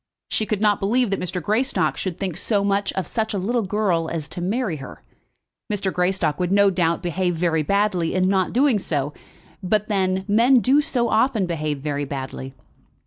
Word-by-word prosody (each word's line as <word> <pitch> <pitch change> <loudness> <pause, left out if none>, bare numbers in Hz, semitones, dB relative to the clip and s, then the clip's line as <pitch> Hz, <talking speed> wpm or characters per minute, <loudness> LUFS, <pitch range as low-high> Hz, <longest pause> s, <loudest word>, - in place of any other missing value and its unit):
She 215 - -1
could 210 -2 -1
not 210 -2 +3
believe 230 +3 +1
that 195 - 0
Mr. 180 0 -3
Greystock 230 - +1
should 185 -3 -4
think 190 -5 -3
so 200 +2 0
much 200 0 0
of 190 - -2
such 220 +4 -2
a - - 0
little 235 +6 0
girl 190 -5 0
as 160 -3 -4
to 175 - -5
marry 200 -1 -1
her. 135 -2 -10 0.7
Mr. 195 -2 -1
Greystock 180 -4 0
would 180 0 0
no 200 0 +5
doubt 170 -1 0
behave 175 +1 -1
very 165 -1 +1
badly 185 0 0
in 185 0 +2
not 190 -1 +1
doing 255 -2 +3
so; 145 -5 -2 0.5
but 210 +3 0
then 190 -2 0
men 235 +6 +5
do 270 +5 +4
so 245 -5 0
often 220 -2 +2
behave 155 -4 -3
very 145 -1 -2
badly! 135 -1 -6
190 Hz, 190 wpm, -22 LUFS, 170-215 Hz, 0.7 s, no